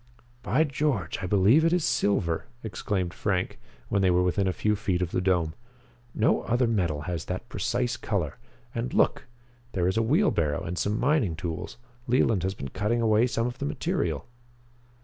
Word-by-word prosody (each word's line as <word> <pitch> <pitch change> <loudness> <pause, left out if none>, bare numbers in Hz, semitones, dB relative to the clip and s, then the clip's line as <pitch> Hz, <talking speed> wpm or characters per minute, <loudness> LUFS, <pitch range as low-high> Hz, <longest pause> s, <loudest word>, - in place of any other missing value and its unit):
"By 150 +5 +2
George, 135 - -1
I 90 - -2
believe 105 - +5
it 165 - +3
is 175 -2 +2
silver," 85 -7 +1 0.2
exclaimed 95 -3 -2
Frank, 95 -2 -1 0.3
when 100 - +1
they 95 - +4
were 90 0 +3
within 95 +2 +1
a - - +2
few 105 +3 0
feet 100 -4 -1
of 90 -2 -2
the - - 0
dome. 90 -4 +1 0.6
"No 110 - +3
other 125 +2 +1
metal 90 -10 0
has 85 +1 -4
that 95 +6 -5
precise 125 0 -1
color. 100 - -2 0.3
And 120 0 -3
look! - - +2 0.5
There 90 -2 +1
is 95 - 0
a - - +4
wheelbarrow 110 - +2
and 85 - -4
some 105 +4 -1
mining 130 - +2
tools. 80 0 -5 0.3
Leland 120 -5 +3
has 95 +2 -2
been 70 - -6
cutting 110 - 0
away 110 +1 +4
some 115 -1 -1
of 125 0 -4
the - - -2
material." 75 +1 -1
100 Hz, 180 wpm, -27 LUFS, 90-120 Hz, 0.6 s, believe